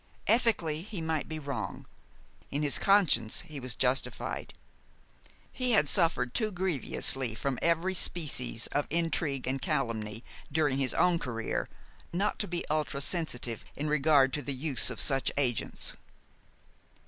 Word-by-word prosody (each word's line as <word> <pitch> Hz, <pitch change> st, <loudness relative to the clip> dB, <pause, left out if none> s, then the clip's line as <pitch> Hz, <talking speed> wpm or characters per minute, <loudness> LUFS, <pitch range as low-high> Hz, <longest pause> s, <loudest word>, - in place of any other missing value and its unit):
Ethically, 195 Hz, -10 st, +2 dB
he 200 Hz, 0 st, -7 dB
might 160 Hz, -2 st, -2 dB
be 155 Hz, -, -4 dB
wrong; 140 Hz, -3 st, -5 dB, 0.6 s
in 145 Hz, +2 st, -2 dB
his 145 Hz, -, +3 dB
conscience 175 Hz, -, +4 dB
he 150 Hz, -2 st, -9 dB
was 125 Hz, -2 st, -2 dB
justified. 130 Hz, 0 st, -1 dB, 1.0 s
He 250 Hz, -2 st, 0 dB
had 150 Hz, -9 st, +4 dB
suffered 140 Hz, -7 st, +2 dB
too 215 Hz, -2 st, +1 dB
grievously 140 Hz, -, 0 dB
from 135 Hz, +2 st, -2 dB
every 170 Hz, +3 st, +2 dB
species 150 Hz, -, 0 dB
of 145 Hz, -, 0 dB
intrigue 160 Hz, -4 st, 0 dB
and 130 Hz, +1 st, -1 dB
calumny 115 Hz, -6 st, -2 dB, 0.3 s
during 145 Hz, -2 st, +1 dB
his 135 Hz, -2 st, 0 dB
own 175 Hz, -2 st, +3 dB
career 115 Hz, -5 st, -3 dB, 0.4 s
not 195 Hz, +5 st, -1 dB
to 205 Hz, -, -1 dB
be 175 Hz, 0 st, -3 dB
ultra 150 Hz, -2 st, -1 dB
sensitive 140 Hz, -7 st, 0 dB
in 150 Hz, -, -3 dB
regard 145 Hz, -3 st, +4 dB
to 145 Hz, -, -1 dB
the 140 Hz, -1 st, -3 dB
use 135 Hz, 0 st, +2 dB
of -, -, -4 dB
such 135 Hz, -2 st, +2 dB
agents. 125 Hz, -6 st, -1 dB
150 Hz, 140 wpm, -30 LUFS, 130-170 Hz, 1.0 s, conscience